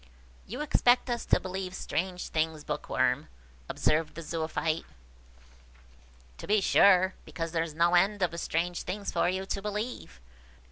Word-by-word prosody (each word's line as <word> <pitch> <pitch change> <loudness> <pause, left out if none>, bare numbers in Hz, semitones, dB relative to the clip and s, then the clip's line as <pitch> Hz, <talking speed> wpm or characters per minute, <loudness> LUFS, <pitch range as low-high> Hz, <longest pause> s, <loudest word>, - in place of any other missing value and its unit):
"You - - -5
expect 250 -4 +3
us 235 -1 -2
to - - +4
believe 185 0 -5
strange 180 0 -3
things, 155 -1 -1
Bookworm," - - 0 0.4
observed 155 +1 0
the 165 - -6
Zoophyte. 160 0 -2 1.6
"To - - -8
be 210 +1 +4
sure, 190 -1 +5
because 165 -1 -5
there 165 -1 0
is 160 -2 -4
no 170 +2 +3
end 195 +3 +3
of 170 -1 -1
strange 175 +2 -1
things 200 +2 -4
for - - +2
you 190 +1 -2
to 195 - -3
believe! 210 - -5
180 Hz, 145 wpm, -29 LUFS, 165-200 Hz, 1.6 s, sure